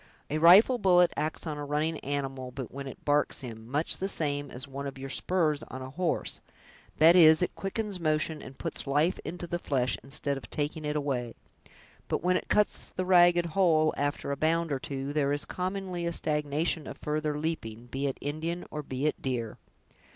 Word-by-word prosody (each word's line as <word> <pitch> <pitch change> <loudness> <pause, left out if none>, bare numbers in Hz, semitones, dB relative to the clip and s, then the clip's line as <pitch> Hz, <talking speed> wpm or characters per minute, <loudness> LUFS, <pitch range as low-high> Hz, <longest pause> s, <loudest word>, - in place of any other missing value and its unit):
A 155 - 0
rifle 195 +10 +7
bullet 180 -3 +5
acts 155 +3 -2
on 150 -2 -4
a - - -4
running 150 +2 -1
animal, 135 -2 -4 0.2
when 140 0 -6
it 135 - -10
barks 145 0 +1
him, 115 -3 -8
much 145 +5 +1
the 195 - -1
same 145 -6 -1
as 130 +4 -5
one 140 +1 -5
of 135 - -7
your 135 0 -6
spurs 160 -5 +1
on 130 0 -7
a 130 - -8
horse; 175 +3 -1 0.6
that 165 +3 +7
is, 160 -1 +7
it - - -1
quickens 200 0 -3
motion, 155 -1 0
and 135 0 -11
puts 165 -3 -4
life 150 +6 +2
into 175 +1 -5
the 175 0 -3
flesh, 130 -6 0
instead 140 0 -3
of 135 - -10
taking 150 +1 -3
it 150 0 -2
away. 130 -5 -2 0.7
But - - -2
when 180 +1 +3
it - - -2
cuts 210 0 +2
the 185 - -3
ragged 175 -1 +5
hole, 160 -3 +3
after 145 0 -2
a - - 0
bound 165 +2 +1
or 135 - 0
two, 135 +1 -4
there 145 -2 +1
is, 145 0 -1
commonly, 185 -2 -3
a 170 - -2
stagnation 150 +1 -1
of - - -7
further 150 0 -2
leaping, 120 -8 -4
be 135 +3 -3
it 135 - -3
Indian 160 +4 -3
or 150 - -4
be 135 -1 -4
it 155 - 0
deer!" 120 -4 -3
150 Hz, 195 wpm, -29 LUFS, 140-170 Hz, 0.7 s, rifle